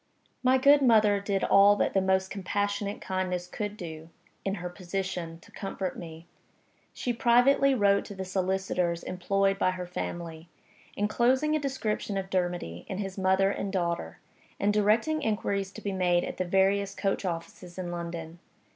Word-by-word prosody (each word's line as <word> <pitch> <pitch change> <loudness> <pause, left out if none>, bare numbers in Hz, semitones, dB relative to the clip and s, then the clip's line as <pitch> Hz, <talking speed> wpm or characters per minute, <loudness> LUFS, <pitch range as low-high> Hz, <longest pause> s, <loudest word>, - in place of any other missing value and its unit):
My 255 +1 +4
good 285 +2 +6
mother 215 -5 +5
did 200 -1 -1
all 200 +1 +6
that - - 0
the 195 - +3
most 190 0 +1
compassionate 205 +1 -2
kindness 185 -1 -2
could 205 +3 -5
do 160 -3 -8 0.3
(in 195 0 -1
her 180 -2 -5
position) 180 -2 -4
to - - -18
comfort 195 -2 -4
me. 165 -1 -9 0.7
She 245 - -2
privately 265 +3 +4
wrote 200 -3 +3
to 200 - -8
the 190 0 -5
solicitors 185 -2 -1
employed 195 +2 0
by - - +3
her 185 -1 -4
family, 170 -2 -6 0.5
inclosing 255 +8 +2
a - - +1
description 240 -7 -2
of 190 0 -4
Dermody 175 - -2
and 190 - -4
his 195 -2 -4
mother 190 0 +2
and 200 -1 -3
daughter 170 -3 -2 0.4
and 205 +1 +2
directing 225 +10 +2
inquiries 200 -5 -1
to - - -9
be 200 - -2
made 180 -2 +2
at - - -5
the 185 - -1
various 195 +2 +2
coach 195 0 -1
offices 175 0 -6
in 180 -2 -4
London. 170 -1 -6
195 Hz, 165 wpm, -28 LUFS, 180-205 Hz, 0.7 s, good